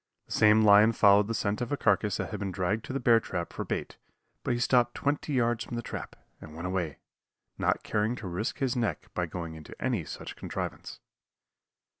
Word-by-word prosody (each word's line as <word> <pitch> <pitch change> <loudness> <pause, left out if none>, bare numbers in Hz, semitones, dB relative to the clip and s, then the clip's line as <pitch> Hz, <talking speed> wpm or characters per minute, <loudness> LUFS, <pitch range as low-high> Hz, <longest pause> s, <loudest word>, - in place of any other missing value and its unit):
The - - -20
same 110 0 +5
lion 105 +2 +7
followed 100 -1 +5
the 115 - -2
scent 100 +1 -1
of 120 - -3
a 145 - 0
carcass 105 -3 +2
that - - -4
had 105 - -4
been 100 -2 -3
dragged 95 +5 -1
to - - -6
the 135 - -1
bear 120 -2 +5
trap 85 -5 -5
for - - -3
bait, - - -4 0.5
but 125 - 0
he - - -2
stopped 120 -1 +3
twenty 145 +1 -1
yards 120 -2 +1
from 120 - -7
the 120 - -3
trap, - - -6 0.3
and 75 - -11
went 85 +2 -6
away, 90 -5 -2 0.6
not - - +1
caring 110 +3 0
to 110 -6 -7
risk 90 +6 -3
his 130 -2 0
neck 115 -4 -2
by 90 -1 -1
going 85 -1 -6
into 80 -1 -11
any 120 -9 0
such 75 - -8
contrivance. - - -6
105 Hz, 210 wpm, -29 LUFS, 95-120 Hz, 0.6 s, lion